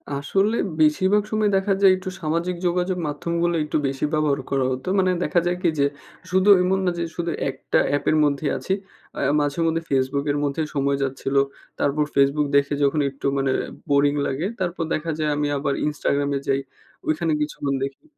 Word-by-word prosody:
আসলে 195 +10 +1 0.3
বেশিরভাগ 190 +7 +3
সময় 215 -1 +2
দেখা 195 +1 +1
যায়, 195 -1 +7
একটু 185 +1 -6
সামাজিক 170 +3 -1
যোগাযোগ 180 +1 0
মাধ্যমগুলো 170 +3 -1
একটু 150 - -1
বেশি 135 +2 -2
ব্যবহার 150 -2 +1
করা 135 -1 +1
হতো। 130 +4 -5
মানে 185 -1 +3
দেখা 175 - +2
যায় 175 0 0
কি? 175 - +3
যে, 140 - +4 0.5
শুধু 190 +2 +3
এমন 190 +1 +1
না 180 - +2
যে, 170 - -1
শুধু 170 -1 -2 0.2
একটা 130 0 -1
অ্যাপের 145 +2 +1
মধ্যে 145 +1 -1
আছি। 190 - -2 0.4
আ - - -3 0.2
মাঝে-মধ্যে 165 +3 0
Facebook 135 +1 0
এর 145 - -1
মধ্যে 145 +2 -1
সময় 140 0 +1
যাচ্ছিলো, 135 +1 0 0.4
তারপর 145 +1 +1
Facebook 140 +2 +3
দেখে 140 +1 +3
যখন 140 +2 +2
একটু 135 - -11
মানে 135 -1 +1 0.4
বোরিং 145 0 +4
লাগে, 145 +7 -2
তারপর 175 -2 -2
দেখা 160 +1 -2
যায় 155 - +1
আমি 145 0 0
আবার 140 0 -1
Instagram 145 -1 0
এ - - -2
যাই, 135 0 +2 0.5
ওইখানে 155 +1 0
কিছুক্ষণ 145 -2 -2
দেখি 135 - -6
150 Hz, 180 wpm, -23 LUFS, 140-175 Hz, 0.5 s, যায়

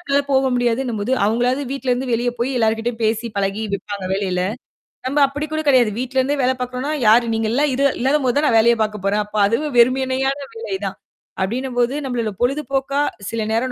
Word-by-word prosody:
நம்மளால 280 -4 +1
போக 265 0 +3
முடியாதுன்னும் 240 -1 0
போது 225 +6 -1
அவங்களாவது 245 +5 +1
வீட்ல 270 -2 -2
இருந்து 250 0 -2
வெளிய 240 +1 +1
போய் 240 +3 0
எல்லார் 225 -1 +2
கிட்டயும் 235 0 -3
பேசி 225 +2 0
பழகி 200 +2 -1
வெப்பாங்க 200 -1 -6
வேலைல. 190 -2 -1 0.7
நம்ம 280 +3 -2
அப்டி 290 +2 -3
கூட 310 - -1
கிடையாது. 250 -5 +4
வீட்ல 260 +1 -4
இருந்தே 280 +3 +1
வேலை 260 +1 +3
பாக்குறோம்னா, 250 +3 -3 0.2
யாரு 235 +2 +6
நீங்க 225 0 0
எல்லாம் 285 +3 +2
இரு 275 +2 +1
இல்லாத 270 +4 +2
போது 250 0 +1
தான் 300 - +2
நான் 225 - +4
வேலைய 235 +1 +4
பாக்க 215 0 -3
போறேன், 205 +1 +2
அப்ப 210 +1 -14
அதுவும் 275 +6 -1
வெறுமையான 260 +2 +2 0.2
வேலை 450 -4 -4
தான். - - -4 0.5
அப்டினம் 250 +5 -3
போது, 245 +2 +2
நம்மளோட 235 -4 -2
பொழுது 270 +5 +1
போக்கா, 275 +1 0 0.3
சில 230 -1 -3
நேரம் 245 +3 0
245 Hz, 200 wpm, -20 LUFS, 225-270 Hz, 0.7 s, யாரு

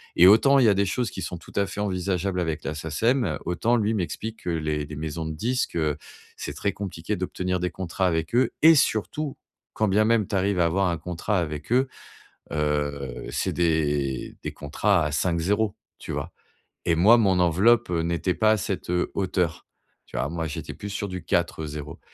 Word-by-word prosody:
Et 90 - +8
autant 135 +8 +6
il 130 - +5
y - - +6
a 100 - +5
des 100 +1 +2
choses 120 +5 -1
qui 95 - -6
sont 90 - -4
tout 80 - -15
à 100 - +2
fait 105 - -7
envisageables 95 -1 -1
avec 80 -3 -2
la 80 - -3
SACEM, 80 - 0
autant 110 +8 +1
lui, 110 0 +1
m'explique 110 +4 -4
que 90 - -3
les 75 -2 -1
les 75 - -8
maisons 80 +1 -4
de 80 - -3
disques, 125 +9 -1
heu, 75 -3 0 0.4
c'est - - -5
très 100 - -1
compliqué 95 0 -4
d'obtenir 90 0 -2
des 90 -1 -1
contrats 95 +1 -2
avec 80 +5 -1
eux. 125 -1 +3
Et 160 +1 +8
surtout, 140 +3 0 0.4
quand 110 - +1
bien 105 +3 +3
même 110 -3 +2
tu 100 - -3
arrives 95 0 +1
à 85 - +4
avoir 95 +3 +2
un 85 - -1
contrat 90 +3 -1
avec 75 +1 -4
eux, 130 +2 +4 0.6
heu, 75 -3 -2
c'est - - -1
des 75 -5 0
des - - -3
contrats 85 +5 +1
à 75 - -1
5 85 +3 0
zéros, 100 +4 +1 0.2
tu - - -7
vois. - - -4 0.6
Et 85 - +4
moi, 105 +8 +7
mon 95 -4 +3
enveloppe 100 +7 +4
n'était 85 +1 0
pas 110 -1 +3
à 110 - +3
cette, 95 -2 -3
heu, 90 0 0
hauteur. 90 -4 -1 0.4
Tu - - -8
vois, - - 0
moi, 85 -1 -3
j'étais 75 - -6
plus 105 - -7
sur 100 +1 -3
du 90 -2 -5
4 85 -2 0
zéros 75 0 -7
90 Hz, 205 wpm, -25 LUFS, 80-105 Hz, 0.6 s, Et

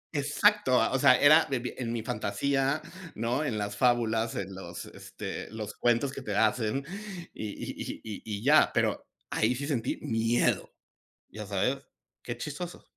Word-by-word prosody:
Exacto, 150 +1 +3
o 135 - +1
sea, 130 -2 +6
era 155 +3 +7
de 135 - -1
vi 120 +1 -4
en 120 -3 -3
mi 115 -2 -3
fantasía, 135 +8 0 0.3
¿no? 120 +7 0
En 120 -7 -1
las 100 0 -3
fábulas, 115 -1 +2
en 95 -1 -4
los, 95 0 -7
este, - - -7
los 110 -1 -6
cuentos 120 +3 +1
que - - -6
te 105 -2 -4
hacen 110 +5 +1 0.5
y 110 - -5
y - - -6
y - - -5
y 105 -3 -6
y 105 0 -5
ya, 150 +3 +6
pero - - 0 0.2
ahí 120 +3 +2
sí 140 - -4
sentí 130 -5 -1
miedo, 115 +1 +1 0.6
¿ya 105 +1 -7
sabes?, 100 +7 0 0.5
qué 120 - -4
chistoso. 150 +7 -6
120 Hz, 165 wpm, -29 LUFS, 110-140 Hz, 0.6 s, era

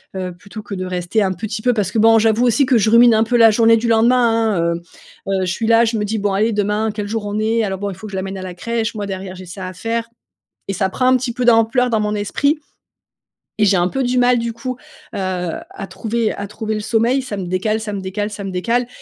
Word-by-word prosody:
heu, 185 -1 -4
plutôt 205 +4 -10
que 205 - -8
de 185 - -3
rester 180 +4 -1
un 190 -2 +1
petit 215 +4 -5
peu. 250 - +3
Parce 200 -4 -1
que 220 - 0
bon, 225 +1 +6
j'avoue 225 +2 +3
aussi 245 +4 +3
que 255 -3 +3
je 215 - +2
rumine 235 +1 +6
un 220 0 +4
peu 240 +1 +1
la 225 -1 +7
journée 230 +1 +4
du 230 +1 -2
lendemain, 230 -1 +3
hein, 170 0 +1
heu 170 - -7 0.6
heu, - - 0
je 180 - -1
suis 225 +3 -2
là, 230 +1 +5
je 225 0 -1
me 210 - -1
dis: 220 +2 -2
«Bon 205 -1 -1
allez 215 +4 +2
demain, 210 +1 0
quel 210 -1 -5
jour 220 0 -3
on 205 +1 -3
est? 225 +1 +1
Alors 195 -2 -2
bon, 200 +1 -3
il - - -8
faut 215 +4 -9
que 200 - -10
je - - -6
l'amène 190 0 -4
à - - -7
la 180 -1 -7
crèche, 230 +3 -3
moi 205 -1 -3
derrière 190 -1 -6
j'ai 185 - -10
ça 185 +1 -7
à 185 - -7
faire», 230 +4 -3 0.6
et - - -1
ça 190 0 0
prend 255 +7 -1
un 255 - +5
petit 245 -1 -3
peu 250 - -2
d'ampleur 240 +2 +3
dans 220 -2 +1
mon 210 0 -1
esprit, 280 +9 0 1.0
et - - +5
j'ai 200 -1 +4
un 175 0 +2
peu 270 +5 -2
du 250 0 0
mal, 245 0 +4
du 230 0 -3
coup, 255 +2 -5 0.4
heu, - - -5
à 185 +1 -4
trouver 220 +4 -2
à 200 - -6
trouver 220 +1 -4
le 215 - -2
sommeil. 230 +4 +1
Ça 245 -6 -6
me 195 - -4
décale, 215 +5 -1
ça 210 -1 -5
me 200 - -4
décale, 200 +3 -3
ça 210 -1 -7
me 195 - -4
décale, 235 +7 0
215 Hz, 280 wpm, -18 LUFS, 195-230 Hz, 1.0 s, la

